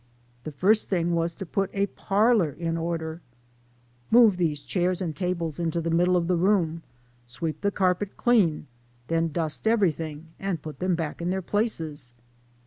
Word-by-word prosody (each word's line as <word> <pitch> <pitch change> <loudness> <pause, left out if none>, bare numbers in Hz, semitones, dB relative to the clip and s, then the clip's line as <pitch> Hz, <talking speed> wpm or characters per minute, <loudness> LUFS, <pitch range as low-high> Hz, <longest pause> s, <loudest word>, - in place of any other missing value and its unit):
The 155 - -4
first 200 +9 +2
thing 175 -3 +1
was 170 0 0
to 195 - -6
put 195 +3 -1
a 200 0 +1
parlor 205 -2 +2
in 165 +3 -3
order. 165 0 -3 0.4
" 120 0 -35
Move 220 -6 +6
these 155 -5 0
chairs 180 -1 0
and 165 -5 -3
tables 170 -2 -2
into 170 0 -1
the 165 0 -2
middle 180 +2 +3
of 170 - 0
the 180 - +2
room, 170 -3 +2 0.5
sweep 155 +6 -4
the 200 - +2
carpet 190 0 0
clean, 205 -13 +3 0.4
then 165 0 +1
dust 160 +4 -1
everything, 165 -8 0
and 195 -4 -2
put 155 -1 -8
them 185 -1 +1
back 165 -1 -4
in 170 - -1
their 190 0 -1
places 160 - -2
170 Hz, 170 wpm, -26 LUFS, 160-190 Hz, 0.5 s, Move